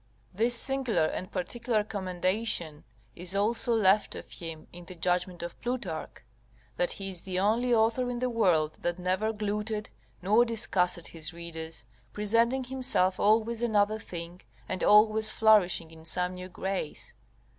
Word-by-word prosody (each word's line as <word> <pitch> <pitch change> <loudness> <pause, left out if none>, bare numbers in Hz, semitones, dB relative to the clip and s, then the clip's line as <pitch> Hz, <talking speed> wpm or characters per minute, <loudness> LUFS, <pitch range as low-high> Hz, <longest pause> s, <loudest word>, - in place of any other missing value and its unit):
This 230 +5 +2
singular 245 - +2
and 185 +4 -4
particular 220 +4 -1
commendation 185 -4 -2 0.3
is 180 +2 -3
also 225 +4 +1
left 205 -1 +3
of - - -9
him 165 -3 -7
in 175 0 -11
the 185 - -10
judgment 180 0 -1
of 170 - -8
Plutarch, 235 -11 -4 0.5
that 175 - 0
he 195 -1 -5
is 180 -3 -3
the 185 -1 -4
only 225 +6 +2
author 235 +2 +2
in 245 - -3
the 250 +1 0
world 180 -10 +1
that 175 0 -1
never 185 +4 0
glutted 210 0 -3 0.3
nor 210 +6 +4
disgusted 185 -7 0
his 160 0 -5
readers, 165 -5 -6 0.3
presenting 230 +5 +2
himself 250 -8 0
always 220 +2 +2
another 215 -2 +2
thing, 175 -2 -8 0.3
and 185 - -3
always 215 +1 +5
flourishing 195 -7 +3
in 160 0 -14
some 180 +2 +1
new 180 0 -8
grace. 190 -3 -4
195 Hz, 145 wpm, -29 LUFS, 175-225 Hz, 0.5 s, always